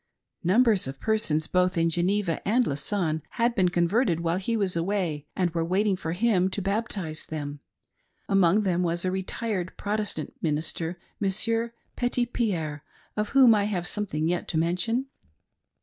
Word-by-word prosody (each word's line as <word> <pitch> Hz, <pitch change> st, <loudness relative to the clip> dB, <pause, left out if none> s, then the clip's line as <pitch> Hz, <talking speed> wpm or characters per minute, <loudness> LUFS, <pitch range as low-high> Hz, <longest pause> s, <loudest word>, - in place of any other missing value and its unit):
Numbers 210 Hz, -, +4 dB
of 135 Hz, 0 st, -6 dB
persons, 190 Hz, -9 st, +1 dB
both 180 Hz, +1 st, +1 dB
in 165 Hz, 0 st, +2 dB
Geneva 175 Hz, +1 st, 0 dB
and 235 Hz, +5 st, +2 dB
Lausanne 160 Hz, +1 st, -1 dB
had 235 Hz, +1 st, +2 dB
been 185 Hz, -5 st, +3 dB
converted 175 Hz, +1 st, +2 dB
while 170 Hz, +1 st, 0 dB
he 225 Hz, +5 st, -1 dB
was 195 Hz, -4 st, 0 dB
away 165 Hz, -4 st, -1 dB
and 180 Hz, -2 st, +1 dB
were 165 Hz, 0 st, -1 dB
waiting 190 Hz, +4 st, +1 dB
for 165 Hz, -3 st, -4 dB
him 190 Hz, -2 st, +2 dB
to 190 Hz, -, -2 dB
baptize 195 Hz, -5 st, -2 dB
them; 145 Hz, -2 st, -5 dB, 0.4 s
— -, -, -52 dB, 0.3 s
among 195 Hz, +1 st, +4 dB
them 180 Hz, -3 st, +1 dB
was 175 Hz, 0 st, 0 dB
a 185 Hz, -, +1 dB
retired 190 Hz, 0 st, -3 dB
Protestant 205 Hz, -6 st, -2 dB
minister, 165 Hz, +2 st, -2 dB, 0.2 s
Monsidur 225 Hz, +4 st, +1 dB, 0.2 s
Petitpierre, 225 Hz, -11 st, -1 dB, 0.3 s
of 210 Hz, +3 st, -2 dB
whotti 240 Hz, -6 st, +7 dB
t 210 Hz, -, -2 dB
have 175 Hz, -3 st, -1 dB
something 175 Hz, -6 st, -1 dB
yet 175 Hz, +1 st, -1 dB
to 160 Hz, -, -1 dB
mention. 185 Hz, +10 st, 0 dB
185 Hz, 155 wpm, -26 LUFS, 165-210 Hz, 0.4 s, whotti